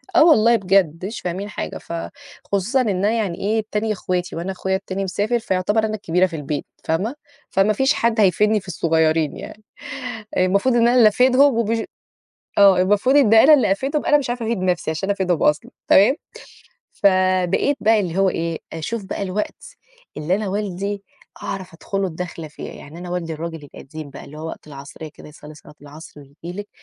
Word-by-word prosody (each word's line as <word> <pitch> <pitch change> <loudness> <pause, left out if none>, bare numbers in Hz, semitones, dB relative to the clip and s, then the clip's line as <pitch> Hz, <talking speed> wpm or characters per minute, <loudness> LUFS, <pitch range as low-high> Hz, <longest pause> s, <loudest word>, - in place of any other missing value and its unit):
آه - - +7
والله 235 -7 +5
بجد 185 -4 +1
مش 220 +4 -6
فاهمين 185 +4 -4
حاجة، - - -5
فخصوصًا 235 +3 -3
إن 225 - 0
أنا 200 +3 +1
يعني 210 -7 -2
إيه، 215 +2 0
تانية 215 +1 0
اخواتي 180 -2 -3
وأنا 175 +3 -3
أخويا 190 0 -2
التاني 195 0 -4
مسافر، 205 +5 -1
فيُعتبر 210 +1 0
أنا 215 0 -2
الكبيرة 180 -2 +1
في 170 - -5
البيت، 150 -1 -4 0.2
فاهمة؟ 190 - -1 0.3
فما 195 +3 +2
فيش 265 +6 +2
حد 230 -1 0
هيفيدني 210 +3 +3
في 195 - -17
الصغيّرين 160 -2 +1
يعني، 215 - -10 0.7
المفروض 200 +7 +2
إن 235 0 +4
أنا 245 - +3
اللي 230 -3 +7
أفيدهم 255 +3 +4
وبش 230 0 +1 0.8
آه 195 -2 +7
المفروض 205 +8 +2
إن 225 -6 +5
أنا 275 +7 +8
اللي 265 -9 +2
أفيدهم، 275 +9 -2
أنا 295 - +5
مش 260 -4 -4
عارفة 240 -2 -3
أفيد 230 -2 -1
نَفسي 180 -3 -1
عشان 160 +5 -3
أفيدهم 185 -4 0
أصلًا، 150 0 +1 0.2
تمام؟ 205 +10 +5 0.8
فبقيت 185 +5 +2
بقى 220 0 +4
اللي 180 -2 -3
هو 195 0 +4
إيه، 165 -1 -3
أشوف 195 +7 -4
بقى 190 - -5
الوقت 200 +2 -4 0.5
اللي 165 +5 0
أنا 210 -1 -3
والدي 200 0 -3 0.4
أعرف 190 -4 -6
أدخُل 195 +4 -4
له 195 - +1
الدّخلة 165 -2 -6
فيه، 150 - -9
يعني 155 +4 -11
أنا 180 0 -8
والدي 175 -2 -3
الراجل 160 -1 -6
القديم 145 +1 -10
بقى 135 - -10
اللي 150 +2 -11
هو 160 - -6
وقت - - -9
العصرية 145 +2 -10
كده - - -13
يصلي 150 0 -13
صلاة 150 - -16
العصر 145 +1 -12
وييجي 165 +7 -9
لِك 205 - -10
190 Hz, 185 wpm, -21 LUFS, 170-220 Hz, 0.8 s, أنا